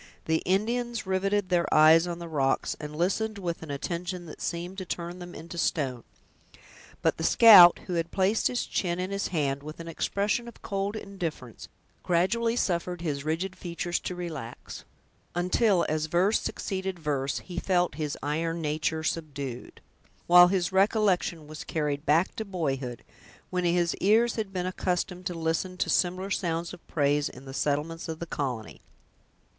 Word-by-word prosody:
The 160 0 +1
Indians 230 +4 0
riveted 190 +1 0
their 175 -1 +1
eyes 160 +2 +6
on 170 -1 -4
the 170 0 -7
rocks, 140 -4 0
and 150 0 -7
listened 205 +6 0
with 175 -4 -4
an 160 - -9
attention 175 +5 -4
that 155 - -10
seemed 175 +3 -4
to - - -4
turn 175 0 -5
them 175 0 -9
into 170 +2 -7
stone. 130 -8 -1 1.0
But - - +2
the 160 - -4
scout, 185 -4 +9
who 180 - -4
had 165 0 -1
placed 195 +4 +2
his 245 - -1
chin 175 -2 -1
in 185 +1 -3
his 200 0 -1
hand, 140 -5 -1
with 155 +2 -9
an 165 - -7
expression 205 +7 -1
of 235 - -13
cold 200 +1 -2
indifference, 170 - -6 0.3
gradually 230 +7 +1
suffered 175 -5 -1
his 145 -5 -2
rigid 170 +5 -2
features 175 -1 -3
to 180 - -5
relax, 155 -9 -7 0.5
until, 180 +2 +2
as 155 0 -1
verse 180 +6 +2
succeeded 190 -2 -3
verse, 140 -4 -1
he 175 -1 -6
felt 180 -2 +1
his 150 -1 -3
iron 165 +3 -1
nature 155 +1 -1
subdued, 140 -6 -4 0.4
while 175 0 +8
his 180 -1 0
recollection 190 -5 +2
was 155 +1 -8
carried 150 -2 -2
back 160 +5 +3
to 220 - -2
boyhood, 140 - -3 0.5
when 180 -1 0
his 175 0 +2
ears 225 +4 +3
had 215 -4 -3
been 180 -2 -2
accustomed 180 0 -2
to 175 - -4
listen 165 +3 -2
to - - 0
similar 185 +2 0
sounds 170 -3 -1
of - - -13
praise, 145 -1 +1
in 130 +2 -13
the 135 - -8
settlements 150 +4 -2
of 160 - -4
the 170 - -5
colony. 130 -9 -4
175 Hz, 165 wpm, -28 LUFS, 155-190 Hz, 1.0 s, scout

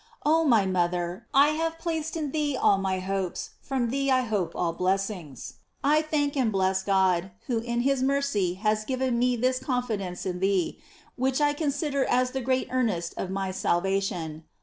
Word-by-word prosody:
Oh 320 +2 +4
my 230 -8 +4
mother, 175 -1 -1
I 285 +1 +6
have 325 +1 -1
placed 325 -1 -3
in 300 -4 -2
thee 295 -3 0
all 195 - +4
my 190 -1 0
hopes, 190 -1 -3
from 250 -4 -1
thee 275 +1 0
I 260 -1 +4
hope 210 -7 -2
all 170 -2 0
blessings. 185 - -2 0.3
I 300 +2 +4
thank 295 -2 -1
and 250 -5 +2
bles» 190 -1 +1
God, 190 -2 +2 0.2
who 240 -3 0
in 235 +1 -1
his 270 +1 +1
mercy 265 -10 +1
has 215 +2 0
given 255 0 -1
me 250 0 +2
this 255 +2 +1
con 250 -2 -1
fidence 195 -7 -4
in 180 -1 -2
thee, 190 -2 0 0.4
which 260 +2 +1
I 290 -1 +3
consider 290 -2 -1
as 250 0 +2
the 265 - -3
great 255 +1 0
earnest 210 -10 0
of 185 - -4
my 190 0 -2
salvation. 175 -4 -1
235 Hz, 180 wpm, -27 LUFS, 190-275 Hz, 0.4 s, I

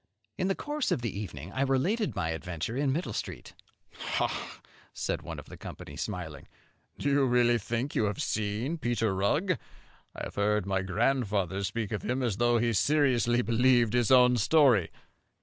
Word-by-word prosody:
In 185 - -1
the 195 - +1
course 295 -2 -2
of 120 - 0
the 115 - -3
evening 90 -5 -6
I 130 - -2
related 165 - +1
my 80 -3 -1
adventure 85 +5 -4
in 140 0 +1
Middle 165 +7 -2
Street. - - -6 0.4
"Ha!" - - -3 0.3
said - - -2
one - - -7
of - - -9
the - - -11
company, 70 - -9
smiling, 85 -5 -5 0.5
"do - - -3
you 140 0 +3
really 120 -2 +3
think 120 +6 -3
you 110 - +1
have 100 -1 -2
seen 110 +10 -2
Peter 120 -5 0
Rugg? 145 - +1 0.6
I - - -6
have - - -6
heard 105 -1 +1
my 95 -1 0
grandfather 100 -2 0
speak 110 +1 -3
of 110 - -2
him 130 +2 -1
as 110 -6 -1
though 120 0 +3
he 115 0 +1
seriously 125 -2 +2
believed 120 0 +3
his 120 -2 +2
own 125 -1 +6
story." 120 - +4
120 Hz, 175 wpm, -29 LUFS, 100-130 Hz, 0.6 s, own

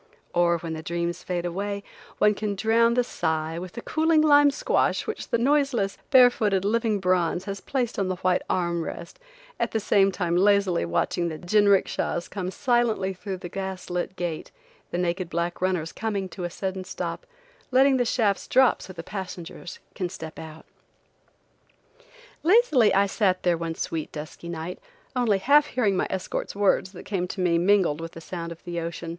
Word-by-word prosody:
Or, 170 0 +3
when 165 -1 -5
the 160 - -5
dreams 170 +1 -3
fade 175 -1 -3
away, 200 +3 -3 0.3
one 210 0 +4
can 205 0 -3
drown 230 +3 +3
the 245 - +3
sigh 160 -6 -2
with 180 0 -8
the 235 - -7
cooling 315 0 +2
lime 290 -1 +6
squash 280 - 0
which - - -5
the - - +2
noiseless, 255 -5 +1
bare 250 -2 +7
footed, 200 -5 0
living 220 -1 +1
bronze 180 -1 +1
has 200 -2 -5
placed 250 -6 -2
on 195 - 0
the 185 - -1
white 180 0 +1
arm 170 -2 0
rest, 170 +1 -8 0.4
at - - 0
the 220 - +1
same 195 -2 +3
time 175 -3 -1
lazily 200 - +3
watching 170 - 0
the 160 - -5
jinrickshas 195 -1 +2
come 185 -3 -3
silently 235 -2 +1
in - - -4
through 190 +1 -6
the 180 - -7
gas 190 0 -6
lit 180 +1 -2
gate, 175 -4 -4 0.4
the - - -3
naked 175 0 -1
black 170 0 -2
runners 180 -3 0
coming 205 -4 -3
to 180 -2 -6
a - - -2
sudden 190 +1 -4
stop, 185 - -5 0.4
letting 265 +1 +4
the 245 - +2
shafts 220 -4 0
drop 260 -1 +4
so 185 - -9
the 165 -2 -8
passenger 180 -3 -7 0.3
can 180 -2 -3
step 160 -2 -8
out. 160 0 -10 1.8
Lazily 330 - +4
I 195 +1 +4
sat 195 -2 0
there 175 -1 +3
one 165 0 -4
sweet, 160 -1 -4
dusky 155 +2 -8
night, 170 +1 -5 0.4
only 235 -5 +2
half 285 +9 +4
hearing 215 -6 +1
my - - 0
escort's 190 +1 -4
words 200 -2 +2
that 180 - -10
came 185 -3 -2
to 190 - -7
me 175 -2 +2
mingled 180 -4 +3
with 165 0 -7
the - - -9
sound 170 0 -6
of 165 - -10
the 175 -1 -4
ocean. 170 0 -5
190 Hz, 185 wpm, -25 LUFS, 170-215 Hz, 1.8 s, bare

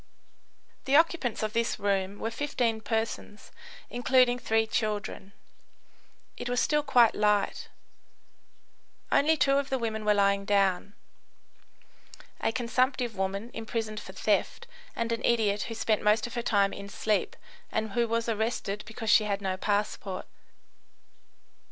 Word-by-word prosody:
The 270 - +2
occupants 315 -8 +2
of 215 0 -2
this 230 0 0
room 195 0 -1
were 225 - -3
15 230 -4 -1
persons, 220 -2 -4 0.4
including 245 0 +3
three 225 -1 +1
children. 210 -3 -3 1.1
It 245 - -5
was 245 0 +1
still 300 +2 +2
quite 245 -6 +4
light. 210 -1 +1 1.4
Only 315 +3 +4
two 275 0 +3
of 280 - -4
the 265 - 0
women 220 -3 -3
were 210 0 +3
lying 200 0 +2
down: 200 0 +1 1.4
a - - 0
consumptive 245 0 0
woman 195 +4 -3
imprisoned 225 -1 -4
for - - -10
theft, 475 - 0 0.3
and 230 0 -2
an 230 +1 -2
idiot 210 -3 +2
who 225 - -5
spent 220 -1 0
most 210 +1 +3
of 240 - -7
her 240 - -2
time 200 -4 +2
in 200 0 -8
sleep 210 +1 -1 0.4
and 220 -1 -2
who 235 +3 +1
was 230 +1 -1
arrested 220 -2 -2
because 225 0 -2
she 215 - +6
had 200 -1 -1
no 190 -2 -2
passport. 205 -1 -2
220 Hz, 140 wpm, -28 LUFS, 205-240 Hz, 1.4 s, she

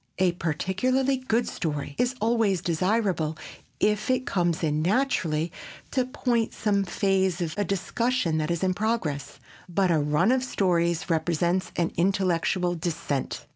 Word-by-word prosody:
A 185 -1 +3
particularly 190 - 0
good 245 -2 0
story 145 -3 -3
is 250 +1 +1
always 220 -5 +2
desirable 175 -2 0 0.4
if 210 +2 +1
it 255 0 +1
comes 175 -3 0
in 150 -1 +1
naturally 170 - +1 0.4
to 255 -2 +1
point 240 -3 -1
some 205 -2 +1
phase 190 -1 +1
of 165 -3 -2
a 205 - 0
discussion 200 -1 0
that 155 +1 -1
is 170 0 -1
in 185 -1 +2
progress, 165 -10 -2 0.3
but 185 +1 +2
a 160 - +3
run 150 +9 +2
of 260 0 +2
stories 170 -8 +1
represents 170 +3 0
an 170 -1 0
intellectual 180 -1 +1
descent. 165 -5 -3
185 Hz, 140 wpm, -26 LUFS, 165-220 Hz, 0.4 s, A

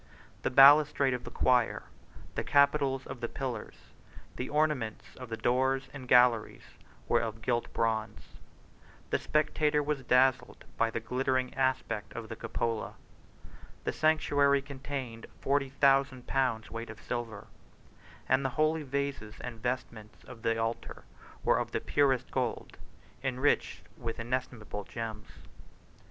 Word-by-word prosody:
The - - 0
balustrade 140 0 +7
of 125 - -4
the - - -6
choir, 125 -2 +2 0.5
the - - -2
capitals 140 -2 +3
of 130 - -7
the 120 - -1
pillars, 125 -5 -5 0.6
the 125 - -4
ornaments 150 -8 0
of 125 -2 -9
the 115 - -4
doors 130 +3 +1
and 135 -3 -8
galleries, 125 -3 +4 0.4
were - - +3
of 110 -1 -5
gilt 120 -1 -1
bronze; 110 -1 -1 0.9
the - - +2
spectator 150 -1 +1
was 145 -1 -1
dazzled 130 +1 +2
by 115 - +2
the 115 - -3
glittering 130 +2 -1
aspect 130 -5 -1
of 115 -2 -6
the 115 - -5
cupola; 115 0 -3 0.9
the - - -1
sanctuary 145 -3 +3
contained 135 -4 -6
forty 140 0 +1
thousand 135 -1 +2
pounds 125 -5 0
weight 115 0 -6
of 110 0 -9
silver; 115 -5 -5 0.8
and 130 +1 +3
the 130 - +1
holy 155 +1 +2
vases 140 -6 -3
and 120 -3 -7
vestments 120 -4 -4
of 125 -3 -12
the 115 0 +1
altar 115 +1 -3 0.4
were - - +3
of - - -4
the - - +1
purest 135 -3 +1
gold, 125 -3 -3 0.4
enriched 130 +2 0 0.2
with 115 -3 -5
inestimable 120 -3 -4
gems. 110 -1 -6
130 Hz, 135 wpm, -30 LUFS, 115-140 Hz, 0.9 s, balustrade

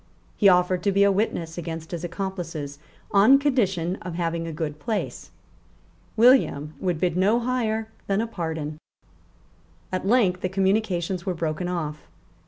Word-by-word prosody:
He 200 - +5
offered 180 0 +3
to 200 - +1
be 200 +1 +4
a 200 - +5
witness 175 -5 -1
against 165 -1 -6
his 170 -1 -4
accomplices 175 -6 -5 0.3
on 215 +7 +7
condition 195 - 0
of 175 -2 -7
having 165 -1 -2
a - - -4
good 150 -1 -4
place. 215 +7 -3 0.9
William 220 - +4
would 180 -4 -1
bid 175 -1 0
no 200 +6 +3
higher 230 -3 -1 0.2
than 195 0 +1
a 225 - +1
pardon. 160 -7 -4 1.1
At 185 +1 -2
length 200 -6 +3
the 185 - -1
communications 190 -2 0
were 185 - 0
broken 165 +1 -2
off. 155 -4 -4
180 Hz, 150 wpm, -25 LUFS, 165-205 Hz, 1.1 s, on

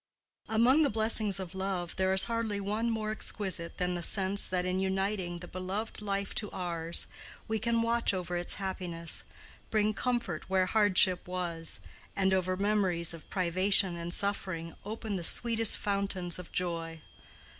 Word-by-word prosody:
Among 240 +7 +4
the 290 - +3
blessings 215 -2 +1
of 185 -2 -7
love 190 -2 -3
there 190 0 +2
is 190 0 +6
hardly 230 -3 -2
one 210 +4 -1
more 215 -1 -2
exquisite 190 -5 -1
than 180 0 -1
the 175 - -3
sense 195 +2 +4
that 180 -1 -1
in 185 +1 -1
uniting 190 -2 -1
the 175 +1 -10
beloved 190 +5 -5
life 200 -1 -2
to 210 - -7
ours 170 -2 -2 0.4
we 220 0 -1
can 230 +1 +1
watch 235 0 +2
over 180 -2 -4
its 175 0 -2
happiness, 180 -4 -2 0.5
bring 215 0 +1
comfort 235 -9 -2
where 190 -1 +2
hardship 190 -3 +3
was, 175 -3 0 0.3
and 190 -1 +2
over 185 0 0
memories 190 -5 +2
of 165 - -12
privation 185 0 +2
and 170 0 -5
suffering 185 -4 -2
open 215 -1 -4
the 175 - -5
sweetest 225 +4 +5
fountains 195 -3 -2
of 180 - -10
joy. 165 -2 -3
190 Hz, 155 wpm, -30 LUFS, 180-210 Hz, 0.5 s, is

